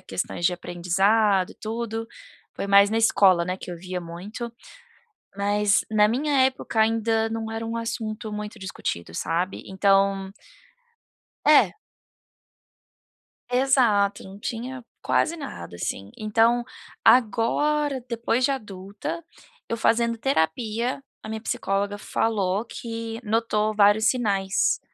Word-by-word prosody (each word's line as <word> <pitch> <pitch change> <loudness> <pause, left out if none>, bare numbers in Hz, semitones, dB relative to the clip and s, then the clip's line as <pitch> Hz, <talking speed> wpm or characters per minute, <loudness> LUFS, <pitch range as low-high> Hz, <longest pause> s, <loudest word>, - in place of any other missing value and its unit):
questões 175 - -4
de 180 - +4
aprendizado 190 +3 +1
e - - -13
tudo, 225 0 -4 0.5
foi - - -4
mais 200 0 +6
na 225 - +1
escola, 190 -6 +4
né, 185 +1 -2
que 180 - -9
eu 175 - -5
via 180 +1 -5
muito. 200 +8 -7 0.8
Mas 205 +1 +2
na 210 -1 +4
minha 275 +4 +1
época 260 -3 -2
ainda 225 0 +2
não 225 0 -4
era 225 0 -4
um 230 - -4
assunto 220 -1 -4
muito 210 +1 -6
discutido, 85 - -5
sabe. 175 +3 -2
Então 195 0 +2 1.1
É. - - +5 1.8
Exato, 240 -6 +3
não 190 +1 -11
tinha 245 +4 -5 0.2
quase 335 - +1
nada, 85 - -8
assim. 95 +3 -4
Então 225 +3 +2 0.4
agora, 260 +4 +3
depois 235 +1 0
de 275 - +3
adulta, 205 - -6 0.5
eu 230 - -1
fazendo 230 +1 +2
terapia, 230 +3 0 0.2
a 220 - -8
minha 220 0 -4
psicóloga 200 -1 -1
falou 205 -1 -1
que 230 -1 -6
notou 215 -1 0
vários 205 +1 +5
sinais, 200 -6 +1
215 Hz, 120 wpm, -25 LUFS, 195-230 Hz, 1.8 s, mais